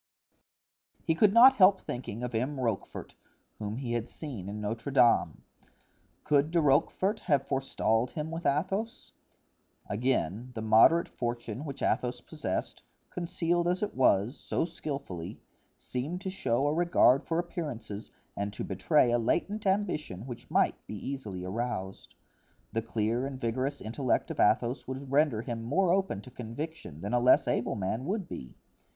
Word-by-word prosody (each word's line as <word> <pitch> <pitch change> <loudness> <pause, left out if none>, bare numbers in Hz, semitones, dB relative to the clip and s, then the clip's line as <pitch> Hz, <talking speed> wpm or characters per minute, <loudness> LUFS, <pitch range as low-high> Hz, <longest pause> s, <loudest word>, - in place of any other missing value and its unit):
He 165 - +3
could 195 +5 +4
not 255 +5 +8
help 190 0 +6
thinking 120 -2 -6
of 125 0 -4
M. 130 +5 -1
Rochefort, 115 -6 -3 0.5
whom 105 +1 -4
he 125 -3 -3
had 120 -1 -2
seen 120 - -7
in 105 +1 -5
Notre 115 +5 -3
Dame; 120 -3 +3 0.8
could 145 +1 +3
De 170 +1 +2
Rochefort 165 +7 +2
have 140 -2 +2
forestalled 125 -3 0
him 155 +1 -5
with 165 +1 -2
Athos? 195 +10 -1 0.8
Again, 120 0 -1
the 110 - -3
moderate 110 +10 +6
fortune 120 +2 -4
which 140 -2 -6
Athos 125 0 0
possessed, 120 - -4 0.3
concealed 175 0 -1
as 180 +3 0
it 210 - -2
was, 115 -1 +3
so - - -2
skillfully, 140 - -6 0.4
seemed 145 +8 -4
to 190 -2 -4
show 135 -8 0
a 145 - +2
regard 165 -6 +4
for 165 - -2
appearances 140 - -5 0.3
and 100 0 -2
to - - -5
betray 150 -7 +2
a 120 - +3
latent 200 - 0
ambition 175 - -1
which 120 -2 -9
might - - +1
be 105 - -6
easily 105 -6 -5
aroused. 95 -2 -4 0.6
The 115 - 0
clear 115 +3 -1
and 135 -2 -7
vigorous 130 +4 -1
intellect 125 +3 -1
of - - -6
Athos 120 +3 +2
would 130 +1 -6
render 140 -6 +2
him 115 -1 -4
more 170 +10 +2
open 190 - 0
to 125 - -12
conviction 120 - -7
than 100 +4 -4
a 120 - +4
less 125 +1 +5
able 120 - 0
man 110 +5 -2
would 195 +1 -2
be. 65 - -8
130 Hz, 155 wpm, -30 LUFS, 115-160 Hz, 0.8 s, not